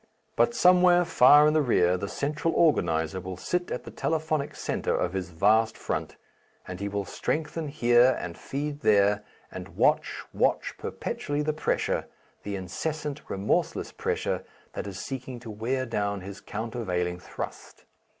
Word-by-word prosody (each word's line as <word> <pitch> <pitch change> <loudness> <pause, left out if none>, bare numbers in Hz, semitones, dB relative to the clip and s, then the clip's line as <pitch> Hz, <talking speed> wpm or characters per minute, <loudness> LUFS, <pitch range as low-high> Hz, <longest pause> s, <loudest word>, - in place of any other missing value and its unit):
But 235 - +3
somewhere 180 -2 +6
far 145 +1 +7
in 150 - +3
the 155 - +4
rear 90 -9 +3
the 100 +2 -4
central 150 +3 -1
organizer 85 - +2
will 95 0 -6
sit 180 - -2
at - - -4
the - - -9
telephonic 155 -2 -1
centre - - -1
of 90 - -1
his 95 -3 -3
vast 110 +6 +3
front, - - -3 0.5
and 90 -1 -6
he 100 0 -3
will 100 0 -2
strengthen 155 +5 -2
here 125 -3 +4
and 85 -1 -6
feed 145 +1 -4
there 105 -1 +4 0.3
and - - -9
watch, - - +2
watch - - +1
perpetually 145 +1 -3
the 155 +1 0
pressure, 155 - -1 0.3
the 100 -1 -4
incessant 150 - -4
remorseless 100 +2 -1
pressure - - -2 0.3
that - - -5
is 95 -2 -6
seeking 130 -2 -6
to 115 -3 -8
wear 125 +5 -2
down 100 -4 -2
his 100 +2 -9
countervailing 95 -6 -3
thrust. - - -8
120 Hz, 150 wpm, -27 LUFS, 95-150 Hz, 0.5 s, far